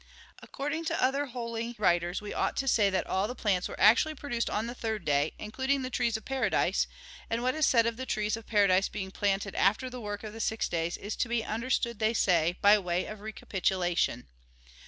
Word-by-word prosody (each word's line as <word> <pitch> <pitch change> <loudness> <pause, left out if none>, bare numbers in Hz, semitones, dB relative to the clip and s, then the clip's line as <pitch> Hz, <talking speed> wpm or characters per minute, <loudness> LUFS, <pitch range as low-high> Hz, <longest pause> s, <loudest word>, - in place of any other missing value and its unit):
According 305 +4 -4
to - - -1
other 275 +3 +1
holy 235 -1 -4
writers, 175 -1 +1
we 210 - -5
ought - - -1
to 270 - -1
say 210 -5 +4
that 190 -2 0
all 190 +2 0
the 250 - -6
plants 195 -6 0
were - - -9
actually 235 +9 +5
produced 240 -5 -2
on 215 - -1
the 240 - -5
third 220 -3 -4
day, 145 0 +1
including 265 +5 -1
the 255 - -4
trees 235 -3 0
of 220 - -14
paradise; 270 -1 +1 0.4
and 230 +1 -1
what 255 +1 +2
is 310 -2 +2
said 230 -2 +4
of 230 -1 -1
the 260 0 -5
trees 215 -1 0
of 225 - -10
paradise 200 -3 +3
being 190 -2 -5
planted 195 -1 -1
after 215 +7 +1
the 250 -1 -7
work 205 -1 -5
of 215 -1 -7
the 225 - -9
six 220 0 0
days 170 0 -2
is 205 +2 -5
to 240 - -1
be 235 -1 0
understood, 235 0 -1
they 220 +1 +1
say, 175 -4 +2
by 205 +1 +7
way 180 -1 -1
of 215 0 -8
recapitulation. 185 - -1
220 Hz, 215 wpm, -29 LUFS, 195-240 Hz, 0.4 s, by